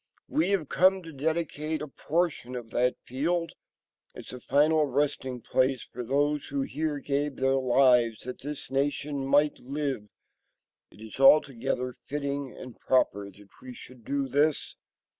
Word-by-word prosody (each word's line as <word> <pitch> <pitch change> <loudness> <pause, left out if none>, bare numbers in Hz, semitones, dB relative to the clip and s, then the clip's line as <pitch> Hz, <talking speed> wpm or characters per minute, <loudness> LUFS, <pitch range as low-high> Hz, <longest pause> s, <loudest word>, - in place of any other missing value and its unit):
We 165 +4 +1
have 190 -7 0
come 185 +3 +3
to 165 -1 -10
dedicate 155 +1 -2
a 150 - -5
portion 150 -3 -2
of 115 -2 -7
that 125 +1 +1
field 165 +6 -1 0.6
as - - -9
a 125 - -7
final 150 +4 +3
resting 130 -2 -1
place 130 +1 +1
for 125 - -8
those 145 +4 0
who 140 0 -2
here 150 +2 -2
gave 140 0 -2
their 135 +1 +1
lives 125 -3 +3
that 125 0 -7
this 145 0 -6
nation 140 0 -1
might 145 +2 +3
live. 135 -5 -3 0.8
It - - -18
is 110 +3 -10
altogether 135 -2 +4
fitting 140 -1 -3
and 125 -3 -11
proper 100 -6 +1
that 100 0 -18
we 125 -1 -9
should 125 -1 -13
do 140 +3 -1
this. 145 +3 +1
140 Hz, 150 wpm, -28 LUFS, 125-150 Hz, 0.8 s, altogether